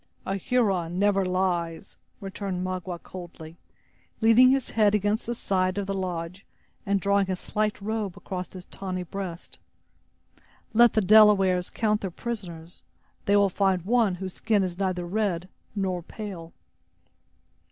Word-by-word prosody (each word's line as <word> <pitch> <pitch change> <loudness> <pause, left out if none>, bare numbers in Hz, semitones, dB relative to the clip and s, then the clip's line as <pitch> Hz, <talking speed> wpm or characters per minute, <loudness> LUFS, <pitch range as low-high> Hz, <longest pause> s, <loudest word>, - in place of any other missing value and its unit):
"A 195 - -2
Huron 195 -6 0
never 200 0 +3
lies!" 180 -2 -1 0.3
returned 195 -2 -4
Magua, 185 -1 -4
coldly, 170 -3 -10 0.6
leaning 230 +3 +6
his 265 -1 +1
head 210 -2 +3
against 210 +2 0
the 240 - -2
side 185 -3 0
of 200 - -1
the 195 - -2
lodge, 180 -1 -4 0.4
and 200 0 +2
drawing 200 0 +2
his 185 -1 -2
slight 215 0 -1
robe 210 -2 -3
across 180 -2 -6
his 180 -1 -9
tawny 185 -2 -5
breast. 180 -1 -7 1.1
"Let 235 0 +6
the 215 - +3
Delawares 195 -3 +5
count 215 -1 0
their 195 - -3
prisoners; 175 -5 -7 0.4
they 200 - +3
will 200 -1 +5
find 190 -2 +1
one 220 -2 +2
whose 185 0 -6
skin 215 -3 +1
is 180 0 -4
neither 185 -2 -1
red 185 -2 -1 0.3
nor 190 -3 -1
pale." 175 -3 -8
195 Hz, 140 wpm, -26 LUFS, 180-210 Hz, 1.1 s, leaning